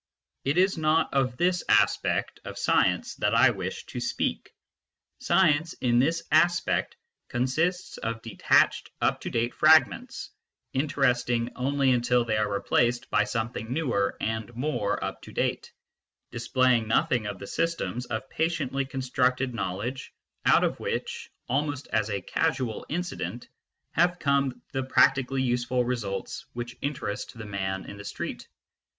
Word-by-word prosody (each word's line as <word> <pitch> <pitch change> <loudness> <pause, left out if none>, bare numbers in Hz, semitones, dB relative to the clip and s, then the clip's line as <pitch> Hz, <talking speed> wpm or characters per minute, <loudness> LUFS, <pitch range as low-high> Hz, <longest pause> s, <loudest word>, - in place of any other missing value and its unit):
It 140 +5 0
is 185 -1 +3
not 155 +1 +2
of 130 -3 +1
this 180 0 +1
aspect - - +2
of - - -8
science - - +2
that - - +1
I - - +6
wish - - -5
to - - -6
speak. - - -2 0.7
Science, 165 -3 +3
in 120 -1 +1
this 165 +6 +1
aspect, 170 +3 +2 0.3
consists 160 +9 -1
of 115 0 -3
detached 115 - +2
up - - +1
to - - -4
date 120 +1 -1
fragments, 155 0 +3 0.4
interesting 125 -4 +1
only 135 +1 +1
until 125 0 +2
they 110 -2 0
are 105 -1 0
replaced 120 +4 +1
by 105 0 +3
something 115 0 -3
newer 125 -9 0
and 110 0 -3
more 125 -5 -1
up - - -4
to - - -11
date, - - -2 0.6
displaying 125 -1 +2
nothing 110 0 +1
of 100 -2 -5
the 100 - -8
systems 125 - -2
of 110 +3 -4
patiently 145 -4 -1
constructed 130 -1 0
know 95 -5 -2
ledge 125 +7 -5 0.4
out - - +6
of - - 0
which, - - -4 0.2
almost 145 +1 -1
as 110 0 0
a 100 -2 -2
casual 130 - -1
incident, 165 -7 -4 0.4
have 175 +2 +2
come 140 -5 0
the 135 - -1
practically 130 0 +3
useful 125 0 +1
results 105 -6 -4
which 120 0 -6
interest 130 -6 -4
the 115 - -7
man 95 -1 -3
in 100 - -9
the 100 - -9
street. - - -6
125 Hz, 145 wpm, -27 LUFS, 115-145 Hz, 0.7 s, I